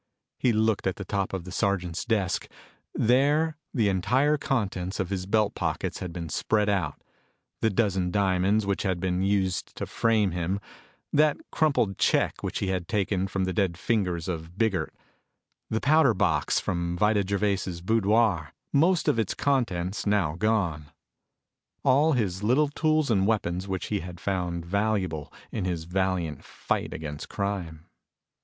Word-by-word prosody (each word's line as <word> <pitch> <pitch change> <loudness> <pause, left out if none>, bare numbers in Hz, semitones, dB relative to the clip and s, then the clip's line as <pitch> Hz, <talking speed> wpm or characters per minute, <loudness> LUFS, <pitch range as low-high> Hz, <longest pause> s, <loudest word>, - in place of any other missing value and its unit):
He 125 - +3
looked 110 -2 +1
at 95 - 0
the 100 - -7
top 100 -1 -1
of 95 -3 -4
the 90 - -9
sergeant's 95 -3 -1
desk. 105 -6 0 0.4
There 145 +7 +2
the 115 -6 +1
entire 125 +10 +2
contents 95 -10 -2
of 95 -1 -2
his 95 -1 -3
belt 105 0 +2
pockets - - -2
had 90 - -5
been 85 -1 -5
spread 105 +6 +1
out 90 -8 -1 0.6
the 110 - +2
dozen 95 -4 +1
diamonds 100 +2 +2
which 100 -1 0
had 95 -4 -1
been 90 0 0
used 95 -2 0
to - - -4
frame 110 -4 +1
him; 90 +3 -1 0.5
that 150 0 +4
crumpled 135 - +1
check - - +2
which - - -3
he 95 - -1
had 90 -2 -2
taken 95 -2 0
from 95 0 -2
the 95 0 -1
dead 90 -2 0
fingers 90 -5 -1
of 85 0 -5
Biggert; 100 -8 0 0.8
the 110 - 0
powder 140 -4 +4
box - - +2
from 85 0 -2
Vida 105 +1 +3
Gervais' 100 -2 -1
boudoir, 105 -5 +2 0.2
most 165 +5 +3
of 115 - +3
its 110 - -1
contents 105 -9 0
now 100 -7 +2
gone; 85 -6 0 0.9
all 145 +4 +4
his 100 -7 -1
little 130 +8 +3
tools 155 -2 +1
and 95 -2 +3
weapons 95 -4 0
which 95 -2 -3
he 105 - +1
had 90 -1 -8
found 90 -3 -2
valuable 95 -5 -1 0.2
in 100 - -2
his 85 -3 -2
valiant 90 -3 -1
fight - - -3
against 75 -2 -6
crime. 90 -6 -3
100 Hz, 155 wpm, -27 LUFS, 90-110 Hz, 0.9 s, that